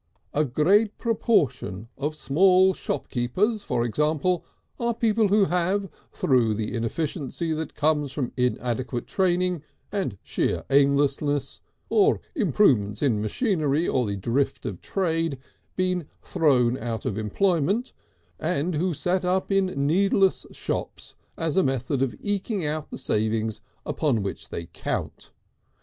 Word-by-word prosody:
A 150 - +3
great 190 - +2
proportion 145 - 0
of 150 +2 -3
small 185 +6 +4
shopkeepers, 185 - -1
for 120 -11 -1
example, 155 +7 +1 0.4
are 235 -1 0
people 225 -2 +2
who 200 0 +4
have, 185 +3 0 0.2
through 120 -5 +2
the 110 +1 -3
inefficiency 150 +6 -2
that 155 -1 -4
comes 150 -2 +1
from 135 -3 -3
inadequate 125 -1 -1
training 180 -3 +1 0.3
and 190 - -2
sheer - - -1
aimlessness, 140 0 +2 0.3
or 420 0 +3
improvements 135 - +2
in 115 -7 +2
machinery 155 - 0
or 125 -3 +1
the 100 - -2
drift 120 +8 -1
of - - -5
trade, 165 -6 -1 0.4
been 180 -4 0 0.2
thrown 130 -5 +2
out 115 -3 -4
of - - -1
employment, 175 - 0 0.5
and 170 +1 0
who 170 +2 0
set 180 +5 0
up 185 +2 0
in 195 -1 +3 0.2
needless 195 +4 +2
shops - - -4 0.2
as 165 -1 -1
a 190 - +4
method 130 0 -1
of 135 -2 0
eking 205 -2 -2
out 150 0 -3
the - - -6
savings 110 0 -1 0.2
upon 130 -10 0
which 100 - -5
they 85 - -5
count. - - -4
155 Hz, 130 wpm, -25 LUFS, 125-185 Hz, 0.5 s, small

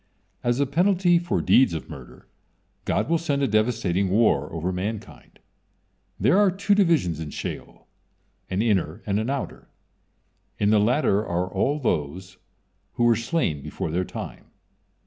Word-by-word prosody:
As 120 +1 +1
a 140 - +3
penalty 175 +3 +3
for 170 0 -1
deeds 125 -10 +4
of 80 - -6
murder, 70 -6 -12 0.6
God - - 0
will 165 0 +1
send 145 -4 -1
a - - +3
devastating 110 -4 +1
war 95 -9 +2
over 85 +3 -2
mankind. 100 +4 -6 0.8
There 185 +8 +4
are 205 -1 +5
two 195 +2 +1
divisions 165 - +2
in 80 -2 -5
Sheol, - - -7 0.6
an 95 +3 0
inner 95 -8 0
and 100 0 0
an 110 +3 -2
outer. 140 -1 -4 0.9
In 105 0 +2
the 110 - +5
latter 110 -1 +2
are 90 -2 -1
all 140 +10 0
those 95 - -3 0.6
who 120 - -1
were 120 -1 +5
slain 115 - -1
before 80 - -5
their 90 +3 0
time. - - -8
110 Hz, 150 wpm, -24 LUFS, 90-145 Hz, 0.9 s, are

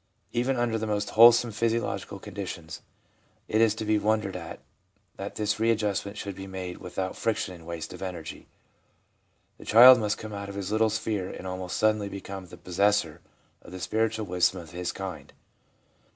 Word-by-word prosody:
Even 125 +2 +1
under 120 -2 0
the 110 - -3
most 105 -1 -1
wholesome 120 +1 +7
physiological 115 +1 -1
conditions, 80 -1 -7 0.7
it 110 - +2
is 110 -2 +4
to 110 - -4
be 105 0 +2
wondered 105 -2 0
at 85 -3 -7 0.6
that - - -6
this 105 0 -1
readjustment 105 -2 0
should 100 -1 -5
be 95 +1 -8
made 95 -2 -6
without 95 +1 -4
friction 110 -4 -1
and 85 -2 -13
waste 85 -2 -6
of - - -10
energy. 85 -4 -7 1.1
The - - -12
child 125 +3 +9
must 105 -1 -1
come 110 -1 -8
out 100 0 -6
of 100 - -7
his 100 0 -4
little 110 +1 +3
sphere 105 -3 -2
and - - -8
almost 90 -1 -4
suddenly 110 -2 +2
become 95 -1 -7
the - - -12
possessor 90 -3 +1 0.4
of - - -14
the 95 - -7
spiritual 110 +2 -1
wisdom 90 0 +1
of 85 -3 -11
his 90 0 -3
kind. 95 -4 -7
100 Hz, 175 wpm, -27 LUFS, 90-110 Hz, 1.1 s, child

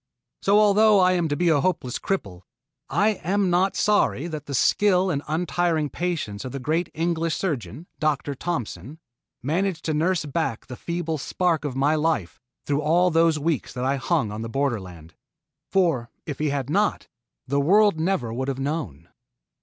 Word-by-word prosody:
So, 200 +1 +4
although 210 0 +5
I 185 0 +5
am 175 -3 +1
to 145 - -1
be 175 +2 +2
a 150 -3 +3
hopeless 160 -9 -1
cripple, 100 - -3 0.5
yet - - -5
I 210 - +5
am 195 +1 +1
not 185 +2 +2
sorry 205 -8 +2
that 155 -4 -6
the 140 - -3
skill 190 +5 +3
and 140 -3 -1
untiring 160 -1 0
patience 155 -14 -3
of 130 - -6
the 140 - -5
great 155 +7 -1
English 165 0 0
surgeon, 150 - -4
Dr. 150 -2 0
Thompson, 130 - -5 0.5
managed 170 +4 -1
to 155 - 0
nurse 165 +2 +1
back 145 -5 -2
the 125 - -8
feeble 170 +1 -3
spark 170 +1 0
of 135 -3 -3
my 140 +3 +2
life 150 - -1 0.2
through 145 0 0
all 175 +4 +3
those 165 -1 +3
weeks 150 -2 -2
that 125 0 -3
I 135 +1 +1
hung 125 -5 0
on 105 +1 -5
the 115 - -5
borderland; 95 - -3 0.6
for 165 -11 +1 0.2
if 145 - -5
he 155 0 +1
had 140 -2 -2
not, 150 - 0 0.4
the 140 +2 0
world 200 +3 +4
never 160 -10 -1
would 130 +3 -3
have 135 -2 -2
known. 135 - -4
155 Hz, 175 wpm, -24 LUFS, 135-175 Hz, 0.6 s, although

